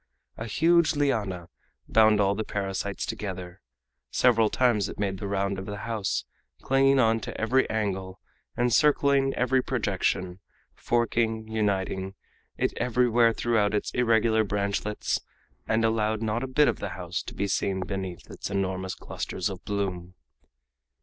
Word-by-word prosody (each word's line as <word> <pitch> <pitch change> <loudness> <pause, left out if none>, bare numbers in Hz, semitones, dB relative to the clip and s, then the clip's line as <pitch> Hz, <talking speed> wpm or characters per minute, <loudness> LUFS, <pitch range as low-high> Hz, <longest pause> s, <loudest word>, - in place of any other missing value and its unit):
A 115 - -6
huge 165 +7 +3
liana 105 - -1 0.4
bound 110 -1 +5
all 100 -1 +3
the 110 +2 -2
parasites 100 -1 -3
together; 95 -2 -6 0.5
several 115 -3 +3
times 120 -5 +2
it - - -8
made 95 -2 -2
the 100 - -4
round 100 0 -1
of 95 - -7
the 100 0 -5
house, 110 -5 -2 0.4
clinging 135 +1 +4
on 115 -2 +3
to - - -7
every 130 +4 +2
angle, 95 -3 -2 0.4
encircling 135 +2 +3
every 130 +1 +2
projection, 95 -6 -1 0.3
forking, 115 -2 0
uniting, 95 -3 -1 0.4
it - - 0
everywhere 120 -1 +3
threw 115 0 0
out 105 0 +1
its 105 - -1
irregular 115 -2 +3
branchlets, 100 +1 -1 0.5
and 110 +1 +2
allowed 110 -1 0
not 110 +2 -1
a 130 - -3
bit 145 +3 +3
of - - 0
the - - -3
house - - -3
to - - -9
be 100 - -1
seen 95 0 0
beneath 95 -2 -5
its - - -6
enormous 95 -1 -2
clusters - - -4
of 95 -2 -8
bloom. 95 -3 -3
105 Hz, 145 wpm, -27 LUFS, 95-120 Hz, 0.5 s, bound